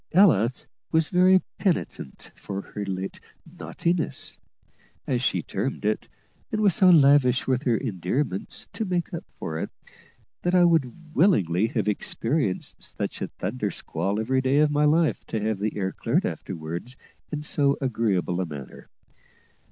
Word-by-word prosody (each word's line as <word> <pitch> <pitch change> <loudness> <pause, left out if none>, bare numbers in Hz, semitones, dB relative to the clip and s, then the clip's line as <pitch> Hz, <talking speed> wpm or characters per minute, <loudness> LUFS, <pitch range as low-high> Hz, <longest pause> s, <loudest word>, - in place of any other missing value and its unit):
Ella 160 - +6 0.4
was 160 -1 +2
very 185 +1 +5 0.2
penitent 170 - -2
for 100 0 -6
her 105 - -3
late 95 0 -4 0.3
"naughtiness," 170 -1 -2 0.7
as - - 0
she - - +1
termed - - -3
it, - - 0 0.4
and 215 - -1
was 205 -4 +4
so 185 +2 +6
lavish 140 -6 +5
with 130 +1 0
her 120 -3 +3
endearments, 95 - -2
to 225 - -2
make 180 -4 -2
up 170 - -4
for 80 0 -4
it, - - -3 0.7
that 175 +1 +1
I 180 - +6
would 165 -5 +4
very 120 - -12 0.2
willingly 105 - +3
have 105 -3 0
experienced 115 - -1
such - - -4
a - - -1
"thunder 105 +2 -3
squall" 100 +2 -2
every 130 +4 +1
day 130 +2 +2
of 150 0 +4
my 150 0 +3
life 155 +1 +2
to 110 - -2
have 105 -1 -1
the 105 +1 -2
air 95 -2 -1
cleared - - 0
afterwards 85 +11 -5 0.3
in 150 -1 -3
so 140 -2 +2
agreeable 105 -8 0
a - - -1
manner. 70 -4 -9
130 Hz, 155 wpm, -25 LUFS, 100-160 Hz, 0.7 s, Ella